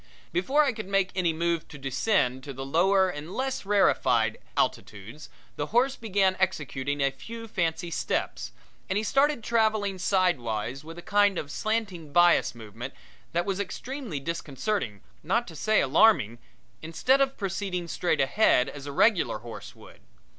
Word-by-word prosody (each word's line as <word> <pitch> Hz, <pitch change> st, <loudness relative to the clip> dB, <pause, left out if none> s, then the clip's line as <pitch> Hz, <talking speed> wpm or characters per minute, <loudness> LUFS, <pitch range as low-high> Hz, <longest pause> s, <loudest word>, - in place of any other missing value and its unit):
Before 265 Hz, -, +2 dB
I 270 Hz, -3 st, +1 dB
could 215 Hz, -3 st, -7 dB
make 195 Hz, -1 st, +1 dB
any 180 Hz, -3 st, +1 dB
move 170 Hz, 0 st, -1 dB
to 150 Hz, -, -11 dB
descend 135 Hz, -, 0 dB
to 140 Hz, -, -6 dB
the 135 Hz, +1 st, -6 dB
lower 190 Hz, +6 st, +3 dB
and 160 Hz, 0 st, -6 dB
less 260 Hz, -5 st, -3 dB
rarefied 205 Hz, -1 st, +2 dB, 0.2 s
altitudes 110 Hz, +7 st, -3 dB, 0.3 s
the 145 Hz, -, -2 dB
horse 255 Hz, -, +2 dB
began 195 Hz, -5 st, +1 dB
executing 145 Hz, -5 st, -1 dB
a 140 Hz, 0 st, +2 dB
few 230 Hz, +10 st, -9 dB
fancy 170 Hz, -3 st, -2 dB
steps, -, -, -2 dB, 0.4 s
and 190 Hz, -, 0 dB
he 210 Hz, -, 0 dB
started 275 Hz, +1 st, +2 dB
traveling 215 Hz, -4 st, +1 dB
sidewise 135 Hz, -, 0 dB
with 165 Hz, +2 st, -10 dB
a 175 Hz, -, -9 dB
kind 205 Hz, -2 st, +3 dB
of -, -, -2 dB
a -, -, -19 dB
slanting 200 Hz, -5 st, -3 dB
bias 175 Hz, -5 st, +4 dB
movement 115 Hz, +3 st, -8 dB, 0.4 s
that 175 Hz, +1 st, 0 dB
was 195 Hz, -1 st, -2 dB
extremely 230 Hz, -, -5 dB
disconcerting, 145 Hz, -, -3 dB, 0.2 s
not -, -, 0 dB
to 160 Hz, -, -10 dB
say 215 Hz, +8 st, +2 dB
alarming, 135 Hz, -, +4 dB, 0.4 s
instead 250 Hz, +12 st, +2 dB
of 270 Hz, 0 st, +1 dB
proceeding 190 Hz, -3 st, -3 dB
straight 170 Hz, -1 st, 0 dB
ahead 135 Hz, -3 st, +3 dB
as 140 Hz, 0 st, -9 dB
a -, -, -4 dB
regular 190 Hz, -, +3 dB
horse 115 Hz, +1 st, -10 dB
would. -, -, -16 dB
175 Hz, 160 wpm, -27 LUFS, 140-210 Hz, 0.4 s, bias